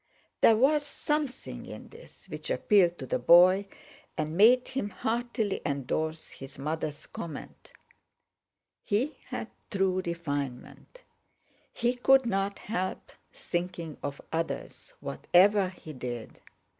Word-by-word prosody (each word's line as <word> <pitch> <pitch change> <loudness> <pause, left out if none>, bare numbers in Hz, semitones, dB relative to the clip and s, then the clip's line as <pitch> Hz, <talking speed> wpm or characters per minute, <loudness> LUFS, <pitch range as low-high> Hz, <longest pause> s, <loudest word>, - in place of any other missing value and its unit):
There 225 - +7
was 290 +5 +4
something 295 -1 -3
in - - -9
this 470 +2 -16
which - - -7
appealed 180 -5 +3
to 130 - -6
the 130 - -1
boy, 180 +8 +6 0.5
and 155 +1 -2
made 240 +6 +6
him 260 -6 -2
heartily 230 -2 -2
endorse 155 +3 -2
his 135 0 -11
mother's 150 +1 -3
comment: 160 -4 -8 1.1
"He 245 +9 0
had - - -5 0.2
true 190 -2 +1
refinement; 150 - -5 0.7
he 240 +1 +1
couldn't 240 -6 +3
help 185 -3 -4 0.2
thinking 175 -3 -4
of 145 0 -4
others, 165 0 -4
whatever 195 +1 +3
he 170 -4 -11
did. 120 -3 -6
185 Hz, 110 wpm, -29 LUFS, 155-230 Hz, 1.1 s, There